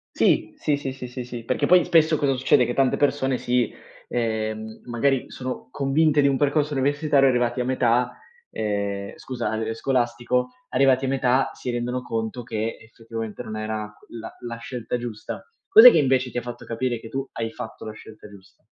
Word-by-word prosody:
Sì, -, -, +2 dB
sì, 145 Hz, -1 st, +1 dB
sì, 135 Hz, -2 st, -4 dB
sì, 125 Hz, -1 st, -7 dB
sì, 120 Hz, -1 st, -7 dB
perché -, -, 0 dB
poi 180 Hz, -1 st, +6 dB
spesso 160 Hz, -1 st, +4 dB
cosa 135 Hz, -2 st, +2 dB
succede? 125 Hz, -1 st, +3 dB
Che 120 Hz, -, -3 dB
tante 135 Hz, -2 st, +2 dB
persone 135 Hz, -3 st, +1 dB
si 125 Hz, 0 st, 0 dB, 0.4 s
ehm, 110 Hz, -2 st, -2 dB
magari 125 Hz, +2 st, +1 dB
sono 130 Hz, 0 st, -6 dB
convinte 145 Hz, +2 st, +2 dB
di 140 Hz, -, +4 dB
un 135 Hz, -1 st, +2 dB
percorso 145 Hz, +1 st, +1 dB
universitario, 145 Hz, +1 st, +3 dB
arrivate 125 Hz, -1 st, +1 dB
a -, -, +1 dB
metà, 125 Hz, -1 st, +1 dB, 0.3 s
ehm, 100 Hz, -2 st, -2 dB
scusa, 125 Hz, -2 st, -4 dB
a -, -, -2 dB
ehm, 110 Hz, 0 st, -2 dB
scolastico, 120 Hz, 0 st, 0 dB, 0.2 s
arrivati 130 Hz, 0 st, +3 dB
a -, -, -1 dB
metà, 130 Hz, -1 st, +2 dB
si 125 Hz, -, -4 dB
rendono 120 Hz, +1 st, -2 dB
conto 115 Hz, +1 st, -3 dB
che 110 Hz, -1 st, -3 dB
effettivamente 115 Hz, 0 st, -7 dB
non 110 Hz, -3 st, -6 dB
era 110 Hz, 0 st, -4 dB, 0.2 s
la 115 Hz, -, -8 dB
la 115 Hz, -1 st, -5 dB
scelta 120 Hz, 0 st, -4 dB
giusta. 115 Hz, -3 st, -6 dB, 0.2 s
Cos'è 440 Hz, +5 st, +11 dB
che -, -, +3 dB
invece 130 Hz, -1 st, +2 dB
ti 120 Hz, -, -6 dB
ha 120 Hz, -, -2 dB
fatto 120 Hz, 0 st, -7 dB
capire 120 Hz, +1 st, -2 dB
che 115 Hz, -, -10 dB
tu 135 Hz, +2 st, -3 dB
hai 115 Hz, -1 st, -3 dB
fatto 110 Hz, -, -8 dB
la 110 Hz, -, -6 dB
scelta 110 Hz, -1 st, -13 dB
giusta? 100 Hz, -2 st, -18 dB
125 Hz, 185 wpm, -24 LUFS, 115-135 Hz, 0.4 s, Cos'è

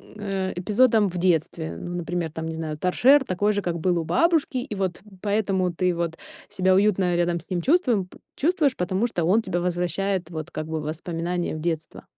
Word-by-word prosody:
э, 195 Hz, -3 st, -3 dB
эпизодом 215 Hz, +3 st, +3 dB
в 180 Hz, -1 st, -5 dB
детстве? 160 Hz, -, 0 dB
Ну, 175 Hz, -, -6 dB
например, 170 Hz, -1 st, -3 dB
там, 160 Hz, 0 st, -5 dB
не 160 Hz, -, -4 dB
знаю, 155 Hz, -2 st, -4 dB
там, 180 Hz, -, 0 dB
торшер 265 Hz, +9 st, +5 dB
такой 205 Hz, 0 st, 0 dB
же, 205 Hz, -, -1 dB
как 175 Hz, -2 st, -2 dB
был 175 Hz, +1 st, +1 dB
у -, -, -2 dB
бабушки, 325 Hz, -, +2 dB
и 245 Hz, -3 st, -4 dB
вот 190 Hz, -3 st, -2 dB, 0.2 s
поэтому 195 Hz, -3 st, +1 dB
ты 180 Hz, +1 st, 0 dB
вот 170 Hz, -1 st, -2 dB, 0.3 s
себя 190 Hz, -2 st, +2 dB
уютно 190 Hz, -3 st, +3 dB
рядом 175 Hz, 0 st, +1 dB
с 165 Hz, -, -17 dB
ним 175 Hz, -2 st, 0 dB
чувствуем, 255 Hz, -, +2 dB
п -, -, -16 dB, 0.2 s
чувствуешь, 305 Hz, -4 st, +2 dB
потому 185 Hz, +5 st, 0 dB
что 175 Hz, -7 st, -2 dB
он 200 Hz, +7 st, +4 dB
тебя 175 Hz, -, -1 dB
возвращает 180 Hz, +1 st, -1 dB
вот 155 Hz, 0 st, -5 dB
как 155 Hz, -, -4 dB
бы 160 Hz, 0 st, -2 dB
в 150 Hz, -, -6 dB
воспоминания 170 Hz, +2 st, -3 dB
в -, -, -5 dB
детство. 160 Hz, -1 st, -3 dB
180 Hz, 205 wpm, -24 LUFS, 170-205 Hz, 0.3 s, торшер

